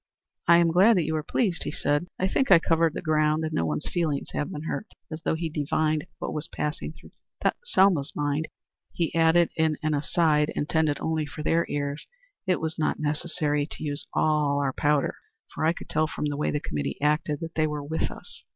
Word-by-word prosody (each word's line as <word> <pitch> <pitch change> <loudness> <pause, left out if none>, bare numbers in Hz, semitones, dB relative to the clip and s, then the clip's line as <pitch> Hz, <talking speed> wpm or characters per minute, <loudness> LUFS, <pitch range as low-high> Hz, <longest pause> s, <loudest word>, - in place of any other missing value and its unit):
"I 170 0 +8
am 170 -1 +4
glad 195 +6 +6
that 175 - +2
you 160 +1 -2
were 155 - 0
pleased," 185 +1 0
he - - -3
said. 145 +4 0
"I 185 - +1
think 265 +7 +1
I 185 - +9
covered 165 -1 +2
the - - -4
ground, 155 0 +2
and 155 - -4
no 80 - 0
one's 75 -1 -2
feelings 160 -5 -1
have 150 - -2
been 150 - -6
hurt." 210 +6 -3 0.2
As 155 0 -5
though - - 0
he 165 +1 -2
divined 155 0 0
what - - -4
was 150 +1 -4
passing 150 0 -3
through 160 - -16 0.5
Selma's 190 - +3
mind, 145 +2 -1 0.5
he 170 -1 -1
added 165 +1 +4
in 160 -2 +1
an 155 0 +1
aside 150 0 +2
intended 150 -1 +1
only 160 -2 -1
for 150 +2 -7
their 165 +2 +2
ears, 145 0 -3 0.4
"It 185 - +2
was 160 0 -3
not 155 - +1
necessary 150 -1 -1
to - - -7
use 145 -1 -2
all 150 -2 +2
our 135 -2 0
powder, 145 0 +1 0.4
for - - -1
I 165 - +4
could - - -10
tell 155 0 +1
from 155 - -4
the 145 -1 -1
way 150 - 0
the 150 - 0
committee 75 - -4
acted 150 0 +1
that 165 0 -5
they 155 -1 +2
were 150 -1 -4
with 160 +3 -1
us." - - -11
155 Hz, 215 wpm, -26 LUFS, 150-165 Hz, 0.5 s, I